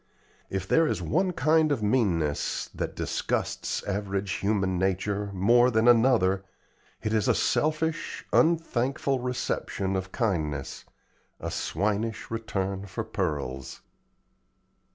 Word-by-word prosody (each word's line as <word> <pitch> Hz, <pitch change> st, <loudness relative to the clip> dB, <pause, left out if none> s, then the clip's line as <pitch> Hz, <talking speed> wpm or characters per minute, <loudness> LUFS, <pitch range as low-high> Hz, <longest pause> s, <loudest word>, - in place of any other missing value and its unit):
If 95 Hz, -1 st, -3 dB
there 160 Hz, +9 st, +4 dB
is 110 Hz, -8 st, -1 dB
one 180 Hz, -, +1 dB
kind 155 Hz, 0 st, +3 dB
of 130 Hz, -7 st, 0 dB
meanness 90 Hz, -, 0 dB
that -, -, -4 dB
disgusts -, -, -2 dB
average 100 Hz, -1 st, -2 dB
human 95 Hz, -2 st, 0 dB
nature 100 Hz, +2 st, 0 dB
more 120 Hz, +6 st, +4 dB
than 110 Hz, -1 st, +2 dB
another 115 Hz, -6 st, +4 dB, 0.6 s
it 110 Hz, -, -1 dB
is 110 Hz, -3 st, +2 dB
a -, -, +4 dB
selfish, 155 Hz, +1 st, 0 dB
unthankful 140 Hz, -5 st, +2 dB
reception 120 Hz, -6 st, -2 dB
of 95 Hz, 0 st, -3 dB
kindness, 75 Hz, -, -2 dB, 0.5 s
a -, -, -4 dB
swinish 105 Hz, +2 st, -2 dB
return 100 Hz, -3 st, -3 dB
for 100 Hz, +4 st, -4 dB
pearls. 70 Hz, -11 st, -3 dB
105 Hz, 110 wpm, -27 LUFS, 95-125 Hz, 0.6 s, there